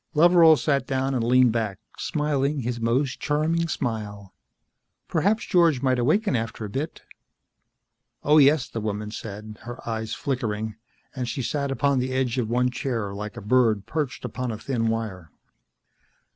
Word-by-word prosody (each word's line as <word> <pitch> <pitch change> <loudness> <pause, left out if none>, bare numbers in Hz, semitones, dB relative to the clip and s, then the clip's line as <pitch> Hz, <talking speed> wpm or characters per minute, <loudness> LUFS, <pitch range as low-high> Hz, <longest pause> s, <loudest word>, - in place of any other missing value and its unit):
Loveral 165 0 +7
sat 140 -3 0
down 135 0 0
and 125 -3 0
leaned 125 0 +5
back, 110 -4 -2 0.2
smiling 145 -1 -1
his 120 0 -3
most 130 +4 0
charming 160 +3 0
smile. 105 - -4 0.7
"Perhaps 200 +7 +1
George 165 -7 +3
might 130 -2 +2
awaken 155 - +2
after 115 -1 -3
a - - -6
bit?" 150 +8 -4 1.2
"Oh, 150 +2 +5
yes," 145 -1 +5
the 115 - -5
woman 105 0 -3
said, 105 0 -8
her 120 0 -9
eyes 110 -1 -3
flickering, 110 -5 -2 0.4
and 125 -2 -3
she 125 +3 -3
sat 140 +3 -1
upon 140 0 +1
the 130 +1 -2
edge 130 -1 0
of 115 -3 -1
one 125 +1 +2
chair, 120 -5 -3
like 105 +1 -6
a - - -6
bird 110 -2 +2
perched 150 -4 -3
upon 125 -1 -4
a 110 - -4
thin 115 -1 -1
wire. 110 -7 -3
125 Hz, 160 wpm, -25 LUFS, 110-140 Hz, 1.2 s, Loveral